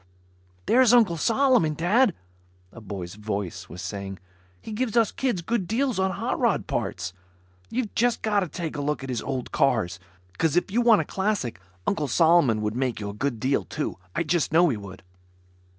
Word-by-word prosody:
"There's 250 -1 +5
Uncle 220 -8 +5
Solomon, 225 - +3
Dad," 205 - +3 0.6
a 115 - -12
boy's 95 -4 -6
voice 100 -4 -5
was 90 - -8
saying. 100 -1 -5 0.4
"He - - -9
gives 235 +1 -1
us 225 -3 +4
kids 240 -10 -1
good 225 -2 -1
deals 245 0 0
on 190 0 +2
hot 190 - -2
rod - - +1
parts. 90 +1 -3 0.6
You've 240 -3 -2
just 240 0 +1
gotta 205 -4 +1
take 165 +1 -5
a 145 - -3
look 145 -1 -2
at 135 - -6
his 120 - -2
old 130 -2 -4
cars, 100 -9 +1 0.4
'cause 160 -3 +2
if 180 +2 +1
you 235 +4 +2
want 235 -3 +5
a - - -5
classic 190 - -2 0.3
Uncle 155 -7 0
Solomon 145 -7 +4
would 105 +1 -2
make 125 -2 -1
you 105 -1 -4
a - - -6
good 120 +2 -2
deal, 130 -3 +1
too. - - -4 0.2
I - - +1
just 170 0 0
know 170 +2 +5
he 130 - 0
would." 100 -2 -10
160 Hz, 185 wpm, -25 LUFS, -, 0.6 s, There's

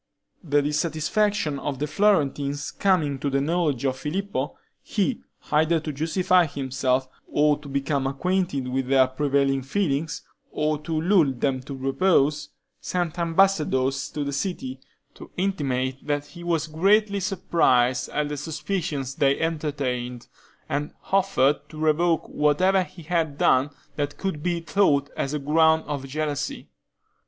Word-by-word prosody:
The 145 -3 +2
dissatisfaction 155 +2 0
of 140 -1 -3
the 145 - -1
Florentines 145 -5 +1
coming 160 -8 +1
to 140 - -1
the 140 0 +1
knowledge 150 -3 0
of 130 -1 0
Filippo, 195 +8 -3 0.2
he, 225 +4 -1 0.3
either 160 +2 +3
to 155 -1 -5
justify 170 +4 +2
himself, 130 -2 -1 0.2
or 150 0 +2
to 145 -1 -11
become 140 0 -1
acquainted 145 -1 -1
with 130 0 -2
their 135 -1 +5
prevailing 135 0 +1
feelings, 150 +1 -1 0.3
or 150 0 -1
to 155 +1 -2
lull 170 -4 +4
them 130 +1 -1
to 135 +2 -7
repose, 145 +2 +1 0.3
sent 175 -1 -2
ambassadors 160 -7 +2
to 150 - -3
the 140 0 -3
city, 195 - -3 0.3
to - - -12
intimate 135 -9 -1
that 145 -1 0
he 175 +2 -12
was 170 -3 0
greatly 200 +6 +2
surprised 145 -10 +2
at 150 0 -1
the 145 - -4
suspicions 150 -3 -3
they 140 -1 +2
entertained, 135 -7 -2 0.4
and 145 0 -3 0.2
offered 190 -8 +3
to 155 - -11
revoke 160 +1 +2
whatever 180 +6 +2
he 180 -1 -8
had 160 -3 -1
done 130 +1 +3 0.3
that 145 -1 -2
could 190 -6 -3
be 175 0 -1
thought 155 -6 +2
a 140 +2 -2
ground 160 +2 +3
of 140 -2 -4
jealousy. 150 +1 -3
150 Hz, 140 wpm, -25 LUFS, 140-170 Hz, 0.4 s, their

